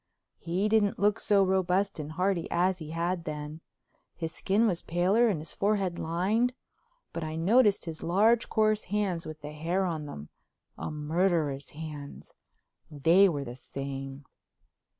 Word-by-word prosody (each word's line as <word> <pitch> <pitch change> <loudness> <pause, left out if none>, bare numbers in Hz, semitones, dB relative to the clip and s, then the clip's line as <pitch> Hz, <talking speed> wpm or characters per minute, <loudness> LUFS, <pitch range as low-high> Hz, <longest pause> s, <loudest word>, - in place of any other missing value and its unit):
He 180 +5 -1
didn't 210 -2 +2
look 205 0 +2
so 200 -2 +3
robust 190 0 +1
and 150 +1 -5
hearty 180 0 0
as 180 +1 +1
he 155 -2 -8
had 170 +2 -2
then; 150 +1 -6 0.5
his 165 -2 -4
skin 205 +7 +2
was 180 -6 +1
paler 185 +8 +2
and 205 -7 +1
his 155 +1 -6
forehead 195 -4 0
lined; 200 +10 +1 0.6
but 165 - -4
I 155 0 -4
noticed 205 +6 +3
his 160 -2 -6
large 220 +7 +3
coarse 215 -1 +2
hands 190 -4 -1
with 155 -1 -8
the 150 - -7
hair 170 +5 -1
on 160 -4 -3
them—a 75 - -10
murderer's 150 -2 0
hands—they 155 +3 -1
were 145 -4 -2
the 120 -2 -7
same. 135 +1 -7
170 Hz, 145 wpm, -29 LUFS, 155-195 Hz, 0.6 s, so